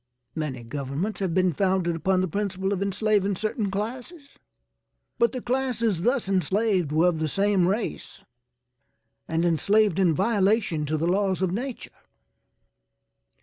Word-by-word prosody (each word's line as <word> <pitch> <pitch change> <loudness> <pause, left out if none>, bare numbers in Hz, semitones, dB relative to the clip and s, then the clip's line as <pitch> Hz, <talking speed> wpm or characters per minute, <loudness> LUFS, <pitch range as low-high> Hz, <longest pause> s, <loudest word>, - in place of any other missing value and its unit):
Many 145 -6 -4
governments 140 - -4
have 185 -4 -1
been 185 -2 +2
founded 185 0 +1
upon 185 +3 +1
the 185 - 0
principle 190 +1 -2
of 195 - -3
enslaving 200 0 +1
certain 215 +1 -2
classes, 255 - -6 0.8
but 235 - +4
the 255 -2 -6
classes 235 -7 0
thus 245 +2 +1
enslaved 190 -2 +1
were 160 +3 +3
of 165 -3 -3
the 160 - 0
same 195 +2 +2
race 210 +5 -3 1.1
and 165 +1 0
enslaved 200 +3 +2
in 175 -5 +3
violation 200 -6 +1
to 155 +2 0
the 160 - -1
laws 190 +1 +1
of 185 - +1
nature." 245 +6 -5
190 Hz, 140 wpm, -25 LUFS, 170-215 Hz, 1.1 s, but